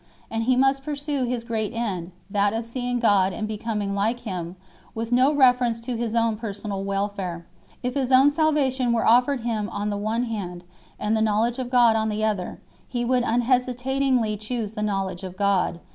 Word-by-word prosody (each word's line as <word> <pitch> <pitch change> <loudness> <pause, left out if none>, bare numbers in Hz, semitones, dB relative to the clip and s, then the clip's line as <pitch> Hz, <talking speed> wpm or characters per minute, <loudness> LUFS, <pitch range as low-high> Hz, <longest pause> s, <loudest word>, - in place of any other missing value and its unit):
And 225 0 -1
he 255 +1 +3
must 270 +1 +2
pursue 290 -2 -2
his 245 -1 -2
great 225 -1 -3
end 190 -7 -3 0.2
that 200 +1 +1
of 225 +1 -2
seeing 245 +1 -2
God 195 -5 +3
and 215 +1 -3
becoming 210 -2 -3
like 220 +5 0
Him 180 -6 -5 0.4
with 225 +1 -4
no 255 +3 +4
reference 250 -5 +3
to 240 +1 -4
his 230 -1 -2
own 230 -2 +2
personal 205 -2 -5
welfare; 195 -3 -3 0.4
if 250 0 -1
his 270 -2 -1
own 265 +3 +6
salvation 275 -5 +1
were 230 - +1
offered 250 +3 +4
him 220 -3 -2
on 205 +1 -3
the 205 - -2
one 220 +4 -1
hand 190 -7 -5 0.4
and 210 +1 0
the 220 - +1
knowledge 220 +3 +1
of 250 -1 -3
God 240 -3 +5
on 220 0 +1
the 215 0 -2
other, 205 -4 -2 0.3
he 240 -1 -2
would 250 +1 +2
unhesitatingly 250 -1 +1
choose 220 0 -4
the 215 - -5
knowledge 195 -3 -2
of 185 -1 -7
God 200 -3 +1
8 170 - -16
225 Hz, 190 wpm, -24 LUFS, 205-250 Hz, 0.4 s, own